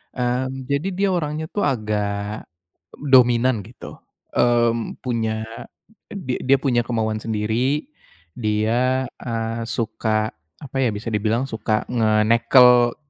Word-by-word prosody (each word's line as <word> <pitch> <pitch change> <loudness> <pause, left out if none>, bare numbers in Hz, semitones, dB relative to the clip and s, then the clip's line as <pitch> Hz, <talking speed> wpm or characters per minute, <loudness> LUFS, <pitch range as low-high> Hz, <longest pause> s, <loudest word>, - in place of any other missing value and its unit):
Mmm, 130 +1 -2
jadi 140 +5 0
dia 195 +1 +1
orangnya 155 -2 -2
tuh 205 - -1
agak 105 -3 -2 0.5
dominan, 125 -4 +4
gitu, 120 - -11 0.4
eee, 120 -1 +3 0.3
punya 110 -3 -1 0.7
di 135 -11 -4
dia 135 +1 +4
punya 120 -4 +2
kemauan 110 -2 -1
sendiri, 115 - -1 0.5
dia, 120 +4 +1 0.2
eee, 115 -1 -3
suka, 110 -1 -1 0.3
apa 135 -3 -11
ya, 125 - +2
bisa 110 +3 -5
dibilang 110 +4 0
suka 110 -1 -1
ngenekel 115 +2 +5
120 Hz, 110 wpm, -22 LUFS, 110-130 Hz, 0.7 s, ngenekel